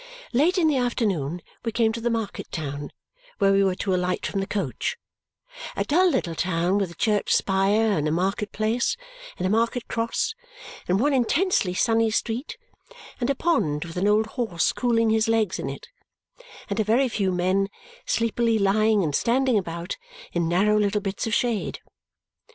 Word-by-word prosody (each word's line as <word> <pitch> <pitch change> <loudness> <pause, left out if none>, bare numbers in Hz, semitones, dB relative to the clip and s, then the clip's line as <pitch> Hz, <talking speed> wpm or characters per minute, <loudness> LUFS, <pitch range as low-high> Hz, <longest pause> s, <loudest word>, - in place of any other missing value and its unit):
Late 315 +10 +3
in 335 -3 +4
the 295 -3 +2
afternoon 190 - -1 0.2
we 230 - -1
came 225 0 +2
to 230 - -5
the 240 - 0
market 225 -3 -3
town 145 -3 -5 0.5
where 195 -2 +3
we 195 0 +4
were 190 -1 +1
to 190 0 -1
alight 180 0 -1
from 200 - -2
the 195 - -2
coach 205 - -2 0.8
a - - 0
dull 360 +5 +3
little 170 - -1
town 175 +3 0
with 195 -3 -1
a 170 - -12
church 210 +2 +1
spire, 200 +3 +2
and 150 - 0
a - - 0
marketplace, 210 - 0 0.4
and 185 - -2
a - - +1
market 230 +2 0
cross, 230 - -1 0.5
and 185 +2 +2
one 285 +4 +2
intensely 260 - +2
sunny 225 +2 +2
street, 230 - -2 0.6
and 245 0 -1
a 280 - +2
pond 160 - 0
with 165 - -9
an 185 +3 +1
old 210 +1 +3
horse 220 -7 -1
cooling 230 -2 +2
his 220 +1 +2
legs 225 -4 +1
in 135 - -3
it, 140 - -8 0.8
and 200 +2 -3
a - - +3
very 235 +6 +3
few 200 -5 0
men 185 +2 +1 0.4
sleepily 230 0 +1
lying 210 +1 +3
and 150 -3 -1
standing 255 - +2
about 170 -3 -3 0.4
in 170 -1 0
narrow 210 +5 +3
little 205 0 +1
bits 195 +4 -3
of 220 - +1
shade. 235 -4 -1
210 Hz, 175 wpm, -25 LUFS, 185-230 Hz, 0.8 s, in